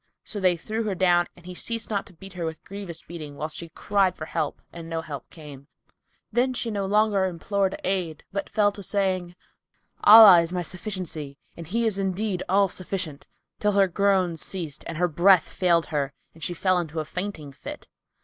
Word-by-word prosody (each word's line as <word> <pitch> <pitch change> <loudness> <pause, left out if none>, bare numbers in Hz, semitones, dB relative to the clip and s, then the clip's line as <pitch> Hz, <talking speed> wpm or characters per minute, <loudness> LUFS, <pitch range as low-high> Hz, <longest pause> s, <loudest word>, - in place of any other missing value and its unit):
So 205 - -5
they 185 -2 +3
threw 215 +7 -3
her 200 -3 -1
down 175 -1 +3
and 175 - -17
he 180 - -7
ceased 230 +5 -3
not 200 -2 -1
to 190 - -15
beat 195 +3 -12
her 180 -2 -5
with 160 -1 -5
grievous 195 -4 -8
beating, 155 -4 -8
whilst 155 +1 -4
she 170 - -8
cried 195 +1 +1
for 155 - -6
help - - -3
and 165 -1 -8
no 165 -1 -2
help 145 -5 -8
came; 145 -4 -12 0.6
then 250 +3 +1
she 230 -1 -1
no 200 -2 -2
longer 210 -1 +3
implored 190 +2 -1
aid 180 -5 -2
but 200 0 -3
fell 210 -1 +3
to 200 - -10
saying, 185 -3 -1 0.7
"Allah 210 -5 +10
is 165 0 -2
my 180 -1 -2
sufficiency, 175 -6 -4 0.2
and 170 -2 -9
He 230 +6 0
is 210 -3 0
indeed 195 0 -1
all 195 +1 +4
sufficient!" 180 -5 -5 0.3
till 210 0 +1
her 195 -1 +4
groans 185 -3 +1
ceased 165 -7 -4
and 165 - -5
her 180 +1 +2
breath 175 +1 +5
failed 170 -3 +2
her 140 -2 -1 0.2
and 165 - -13
she 175 - -2
fell 185 0 +2
into 160 -2 -4
a 155 - -3
fainting 180 -4 -5
fit. 135 - -9
185 Hz, 195 wpm, -25 LUFS, 165-200 Hz, 0.7 s, Allah